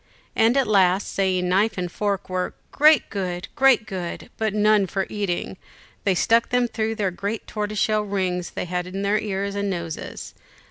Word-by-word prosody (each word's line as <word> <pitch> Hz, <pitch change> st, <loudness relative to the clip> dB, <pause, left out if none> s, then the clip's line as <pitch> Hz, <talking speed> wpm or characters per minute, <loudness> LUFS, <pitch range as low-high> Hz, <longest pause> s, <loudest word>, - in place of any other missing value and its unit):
And 230 Hz, +4 st, +4 dB
at 270 Hz, -, +3 dB
last, 195 Hz, -2 st, +2 dB
saying 190 Hz, -2 st, +1 dB
the 180 Hz, -, -1 dB
knife 200 Hz, +4 st, +2 dB
and 180 Hz, -1 st, -3 dB
fork 200 Hz, 0 st, -2 dB
were 185 Hz, 0 st, -2 dB, 0.2 s
"great 305 Hz, -1 st, +5 dB
good 180 Hz, -3 st, -3 dB
great 265 Hz, -4 st, +4 dB
good; 185 Hz, -5 st, -6 dB
but 220 Hz, -1 st, +1 dB
none 210 Hz, -1 st, +3 dB
for 195 Hz, +1 st, -1 dB
eating," 195 Hz, -3 st, -2 dB, 0.5 s
they 195 Hz, -2 st, +3 dB
stuck 230 Hz, +6 st, +3 dB
them 245 Hz, -1 st, +2 dB
through 225 Hz, -1 st, -2 dB
the 200 Hz, -4 st, 0 dB
great 200 Hz, +5 st, -4 dB
tortoiseshell 215 Hz, 0 st, 0 dB
rings 185 Hz, -3 st, -1 dB
they -, -, -4 dB
had 180 Hz, 0 st, -3 dB
in 195 Hz, +2 st, -4 dB
their 205 Hz, +1 st, +2 dB
ears 200 Hz, -1 st, -2 dB
and 200 Hz, 0 st, -1 dB
noses. 170 Hz, -4 st, -5 dB
200 Hz, 180 wpm, -23 LUFS, 185-215 Hz, 0.5 s, great